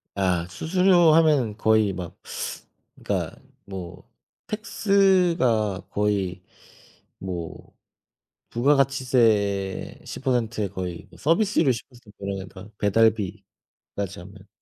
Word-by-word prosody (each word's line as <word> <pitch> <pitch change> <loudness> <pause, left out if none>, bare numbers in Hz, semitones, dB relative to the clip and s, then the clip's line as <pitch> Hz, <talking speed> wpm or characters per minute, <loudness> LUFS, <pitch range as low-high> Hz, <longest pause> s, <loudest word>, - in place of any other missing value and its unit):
아 90 -3 +1
수수료 175 - +4
하면은 150 -9 +3
거의 110 -2 +3
막 90 -2 -7 0.8
그러니까 - - -3 0.3
뭐 90 -3 -9 0.4
tax가 180 - +2
거의 100 -3 -1 0.8
뭐 90 -3 -7 0.8
부가가치세 120 -7 +1
10% 120 -4 -1
에 100 - 0
거의 90 -3 -6
뭐 - - -17
서비스료 165 -3 +2
10% 120 -2 -8
그러면 100 -1 -5
다, 95 +1 -11
배달비까지 100 -2 -1
하면. 95 +1 -14
110 Hz, 190 characters per minute, -24 LUFS, 95-140 Hz, 0.8 s, 수수료